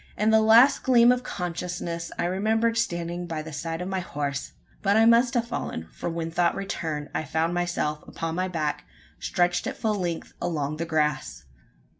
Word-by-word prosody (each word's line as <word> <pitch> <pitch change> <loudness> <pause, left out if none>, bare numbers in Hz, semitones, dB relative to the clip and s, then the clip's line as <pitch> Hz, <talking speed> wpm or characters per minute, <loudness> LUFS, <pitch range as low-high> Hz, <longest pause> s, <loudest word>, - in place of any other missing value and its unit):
In 215 +1 +3
the 220 0 +6
last 230 +5 +6
gleam 240 -2 +6
of 250 0 +1
consciousness, 175 -4 -4
I - - 0
remembered 220 +5 +1
standing 175 -5 -2
by 160 -2 -4
the 160 0 -9
side 165 +3 -4
of - - -5
my 190 0 -1
horse. 145 -5 -4 0.3
But 200 +1 +3
I 225 - +6
must 235 +2 +5
have 235 -1 +2
fallen: 80 - -4
for - - -4
when 165 0 -3
thought 175 0 +2
returned, 160 -6 -4
I - - -1
found 160 +3 0
myself 175 -4 -1
upon 165 -1 -4
my 185 +2 -1
back, 155 -5 -2 0.3
stretched 175 +3 +1
at 265 - -4
full 220 -2 0
length 175 -5 -3
along 155 -4 -2
the 165 - -2
grass! 155 - -1
175 Hz, 185 wpm, -26 LUFS, 160-215 Hz, 0.3 s, the